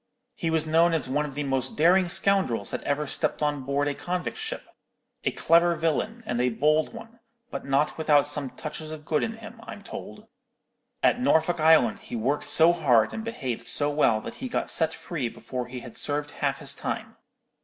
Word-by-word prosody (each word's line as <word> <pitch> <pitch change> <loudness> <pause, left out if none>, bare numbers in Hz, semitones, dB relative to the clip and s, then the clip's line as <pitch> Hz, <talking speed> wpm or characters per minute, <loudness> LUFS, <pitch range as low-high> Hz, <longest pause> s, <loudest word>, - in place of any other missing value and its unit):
He 165 - -3
was 160 -1 +2
known 165 +2 +3
as 155 - 0
one 145 +3 0
of 140 - -10
the 145 - -2
most 135 -2 -1
daring 175 +3 +4
scoundrels 175 - +2
that - - -3
ever 145 +1 -1
stepped 150 - -1
on 145 -1 0
board 140 +2 -1
a 145 - 0
convict 180 +4 -3
ship; 440 0 -5 0.6
a - - +2
clever 170 +1 +3
villain, 170 +9 -1
and 120 - -1
a 125 - +2
bold 150 +6 +2
one, 230 0 -12 0.3
but - - -5
not 140 +3 +1
without 145 -2 +4
some 145 -2 -3
touches 155 +3 -7
of 155 -1 -8
good 155 -2 +1
in 225 - -2
him, 225 -1 -11
I'm - - -9
told. - - -9 0.8
At 250 - +3
Norfolk 170 - +2
Island 155 -8 +4
he - - -8
worked 130 +6 -1
so 165 +2 +5
hard 125 -10 +3
and 220 - -4
behaved 130 - -4
so 145 0 +2
well 115 -7 +3
that - - -7
he 260 - -4
got - - -2
set 160 -1 +2
free 150 -7 -4
before 125 +1 -6
he 125 0 -7
had 120 -1 -11
served 145 0 -1
half - - -1
his - - -1
time. - - -5
150 Hz, 200 wpm, -26 LUFS, 135-170 Hz, 0.8 s, so